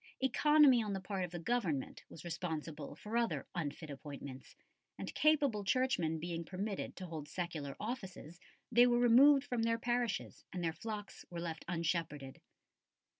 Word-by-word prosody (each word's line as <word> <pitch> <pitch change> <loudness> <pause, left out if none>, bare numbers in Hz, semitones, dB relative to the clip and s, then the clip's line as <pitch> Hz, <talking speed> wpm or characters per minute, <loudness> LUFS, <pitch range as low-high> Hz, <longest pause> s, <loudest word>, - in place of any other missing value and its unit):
Economy 280 0 +5
on 210 -2 -2
the 195 - -2
part 190 0 -3
of 180 - -3
the 175 - -6
Government 170 - -1
was 155 - -11
responsible 160 -3 -4
for 210 +8 -6
other 235 -1 0
unfit 155 -2 -4
appointments, 140 -2 -9 0.4
and - - -5
capable 285 -9 +3
Churchmen 195 -9 +1
being 170 0 -3
permitted 195 +4 -4
to 185 - -6
hold 160 -4 -6
secular 155 -6 -4
offices, 190 - -6 0.3
they 240 +1 +7
were 240 0 +3
removed 265 +4 +7
from 245 -5 -2
their 230 0 +2
parishes 240 -1 -1
and 180 -1 -4
their 165 -1 0
flocks 210 +1 -6
were 175 - -5
left 165 -2 -4
unshepherded. 165 -5 -2
185 Hz, 155 wpm, -35 LUFS, 160-240 Hz, 0.4 s, they